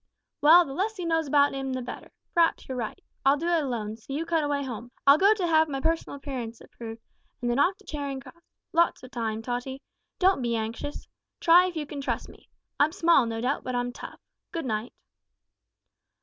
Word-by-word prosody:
"Well, 335 Hz, +4 st, +8 dB
the 270 Hz, -, -7 dB
less 425 Hz, +7 st, -1 dB
he 360 Hz, -, -4 dB
knows 325 Hz, -2 st, +1 dB
about 285 Hz, 0 st, +4 dB
'im 270 Hz, -1 st, -3 dB
the 255 Hz, -, -2 dB
better. 245 Hz, -, -8 dB, 0.2 s
P'r'aps 335 Hz, -1 st, +3 dB
you're 260 Hz, -, -4 dB
right. 230 Hz, -4 st, -4 dB, 0.2 s
I'll 275 Hz, +2 st, +5 dB
do 325 Hz, -, -4 dB
it 340 Hz, -3 st, +2 dB
alone, 220 Hz, -5 st, -3 dB
so 230 Hz, -, -13 dB
you 315 Hz, +4 st, -2 dB
cut 330 Hz, -2 st, +1 dB
away 285 Hz, -1 st, 0 dB
home. 240 Hz, -2 st, -6 dB, 0.2 s
I'll 280 Hz, +2 st, +7 dB
go 405 Hz, +3 st, +6 dB
to 385 Hz, -4 st, -1 dB
have 315 Hz, -2 st, +4 dB
my 270 Hz, -1 st, -2 dB
personal 325 Hz, 0 st, -1 dB
appearance 255 Hz, -5 st, -6 dB
improved, 225 Hz, -1 st, -10 dB, 0.4 s
and 240 Hz, -2 st, -1 dB
then 240 Hz, -, +1 dB
off 370 Hz, +6 st, +3 dB
to -, -, -22 dB
Charing 280 Hz, -3 st, -4 dB
Cross. 275 Hz, +5 st, -14 dB, 0.3 s
Lots 335 Hz, -4 st, +2 dB
of 255 Hz, -, -11 dB
time, 225 Hz, -2 st, -3 dB
Tottie. 250 Hz, +3 st, -4 dB, 0.3 s
Don't 375 Hz, -5 st, +3 dB
be 235 Hz, -1 st, 0 dB
anxious. 225 Hz, +6 st, -4 dB, 0.3 s
Try 350 Hz, +2 st, +6 dB
if 360 Hz, -, -6 dB
you 310 Hz, -2 st, -2 dB
can 285 Hz, -1 st, -6 dB
trust -, -, -3 dB
me. -, -, -17 dB, 0.3 s
I'm 300 Hz, +2 st, +4 dB
small, 335 Hz, -9 st, +4 dB
no 225 Hz, 0 st, -3 dB
doubt, 260 Hz, +4 st, -1 dB
but 255 Hz, 0 st, -3 dB
I'm 245 Hz, 0 st, -1 dB
tough. -, -, -9 dB, 0.3 s
Good 330 Hz, -4 st, -3 dB
night." 220 Hz, 0 st, -2 dB
280 Hz, 210 wpm, -27 LUFS, 245-330 Hz, 0.4 s, Well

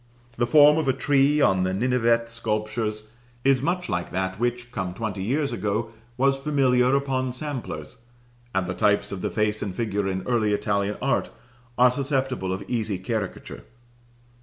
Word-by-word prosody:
The 120 Hz, 0 st, +1 dB
form 150 Hz, +2 st, +7 dB
of 155 Hz, -, -2 dB
a 135 Hz, -, +3 dB
tree 145 Hz, +2 st, +2 dB
on 95 Hz, -7 st, +3 dB
the 95 Hz, 0 st, 0 dB
Ninevite 115 Hz, 0 st, +2 dB
sculptures 110 Hz, -1 st, -3 dB, 0.3 s
is 135 Hz, -1 st, +3 dB
much 180 Hz, +4 st, -1 dB
like 85 Hz, 0 st, -2 dB
that 95 Hz, +1 st, -2 dB
which, 120 Hz, 0 st, -2 dB
come 95 Hz, -6 st, -4 dB
twenty 105 Hz, -3 st, -4 dB
years 140 Hz, +8 st, 0 dB
ago, 110 Hz, +2 st, -2 dB, 0.3 s
was 135 Hz, +1 st, +3 dB
familiar 135 Hz, -3 st, +2 dB
upon 130 Hz, -2 st, -1 dB
samplers; 145 Hz, -1 st, -5 dB, 0.6 s
and 95 Hz, -1 st, +1 dB
the 95 Hz, -, -3 dB
types 105 Hz, +2 st, +1 dB
of 95 Hz, -2 st, -5 dB
the -, -, -1 dB
face 110 Hz, -1 st, 0 dB
and 100 Hz, -3 st, -4 dB
figure 105 Hz, -4 st, -1 dB
in 95 Hz, -1 st, -2 dB
early 110 Hz, -4 st, +1 dB
Italian 100 Hz, 0 st, 0 dB
art 135 Hz, -, +1 dB, 0.5 s
are 125 Hz, 0 st, +6 dB
susceptible 130 Hz, -7 st, -1 dB
of 95 Hz, +1 st, -3 dB
easy 110 Hz, -5 st, -1 dB
caricature. 100 Hz, +1 st, -5 dB
115 Hz, 160 wpm, -25 LUFS, 100-135 Hz, 0.6 s, form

